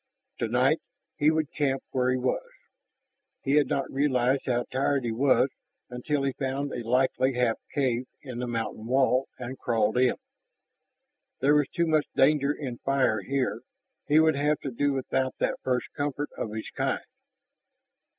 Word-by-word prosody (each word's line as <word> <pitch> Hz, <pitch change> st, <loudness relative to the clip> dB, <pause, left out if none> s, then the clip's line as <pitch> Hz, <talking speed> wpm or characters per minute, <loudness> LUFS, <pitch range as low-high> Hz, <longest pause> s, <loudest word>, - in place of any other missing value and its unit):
Tonight -, -, +2 dB, 0.4 s
he 150 Hz, -, +4 dB
would 155 Hz, -2 st, 0 dB
camp 135 Hz, -3 st, 0 dB
where 125 Hz, -1 st, +1 dB
he 130 Hz, -, +2 dB
was. 130 Hz, -, -1 dB, 0.9 s
He 135 Hz, -, -1 dB
had 150 Hz, 0 st, +4 dB
not 135 Hz, -, -1 dB
realized 135 Hz, -1 st, +1 dB
how 120 Hz, -1 st, +1 dB
tired 135 Hz, +1 st, +1 dB
he 120 Hz, -, -1 dB
was 130 Hz, +3 st, +3 dB, 0.4 s
until 135 Hz, +4 st, -1 dB
he 135 Hz, -, +1 dB
found 135 Hz, +1 st, -2 dB
a -, -, -3 dB
likely 130 Hz, +2 st, +2 dB
half 120 Hz, -2 st, +2 dB
cave 130 Hz, -3 st, 0 dB, 0.2 s
in 125 Hz, -4 st, -6 dB
the 125 Hz, -, -2 dB
mountain 115 Hz, -1 st, -3 dB
wall 130 Hz, +1 st, +3 dB
and 125 Hz, +1 st, -7 dB
crawled 110 Hz, 0 st, +1 dB
in. 125 Hz, -1 st, +3 dB, 1.2 s
There 140 Hz, +3 st, +4 dB
was 150 Hz, -2 st, +3 dB
too 170 Hz, -, 0 dB
much 155 Hz, -2 st, +2 dB
danger 140 Hz, 0 st, +4 dB
in 130 Hz, -5 st, -5 dB
fire 135 Hz, -6 st, +1 dB
here; 135 Hz, +4 st, -1 dB, 0.5 s
he 150 Hz, +2 st, +5 dB
would 160 Hz, -1 st, +4 dB
have 145 Hz, +1 st, +1 dB
to 135 Hz, -, -4 dB
do 145 Hz, +4 st, +1 dB
without 130 Hz, -1 st, -1 dB
that -, -, -1 dB
first 125 Hz, -1 st, 0 dB
comfort 145 Hz, 0 st, -2 dB
of 110 Hz, -, -4 dB
his 110 Hz, 0 st, -6 dB
kind. -, -, -1 dB
135 Hz, 160 wpm, -27 LUFS, 125-145 Hz, 1.2 s, he